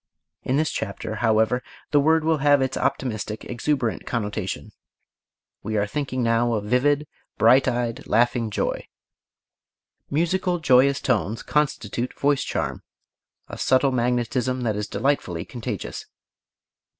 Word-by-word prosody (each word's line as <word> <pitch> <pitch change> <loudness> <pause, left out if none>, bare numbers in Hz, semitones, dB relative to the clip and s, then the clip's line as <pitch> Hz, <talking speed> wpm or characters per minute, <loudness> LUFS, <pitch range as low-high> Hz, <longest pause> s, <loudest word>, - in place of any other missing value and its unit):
In 130 - 0
this 155 +1 +1
chapter, 110 +1 -4
however 110 +1 +2 0.3
the 145 - +5
word 160 +2 +3
will 160 -1 +2
have 145 0 +5
its 130 0 -1
optimistic, 110 -4 -2
exuberant 125 -1 -1
connotation 105 - -3 0.9
we 110 +1 -2
are 100 - +2
thinking 130 +2 -2
now 115 +1 +2
of 105 -2 -1
vivid, 145 +6 +2 0.3
bright 125 +5 +5
eyed, 120 -2 -2
laughing 120 +1 +2
joy. 105 - -2 1.2
Musical, 175 +4 +1
joyous 140 -3 +4
tones 115 -3 0
constitute 125 -5 -1
voice 140 -1 +2
charm, - - -3 0.7
a - - -8
subtle 130 +1 +3
magnetism 125 +1 0
that 110 -3 0
is 105 0 -3
delightfully 100 -8 -1
contagious. 120 -3 -6
125 Hz, 125 wpm, -24 LUFS, 110-140 Hz, 1.2 s, the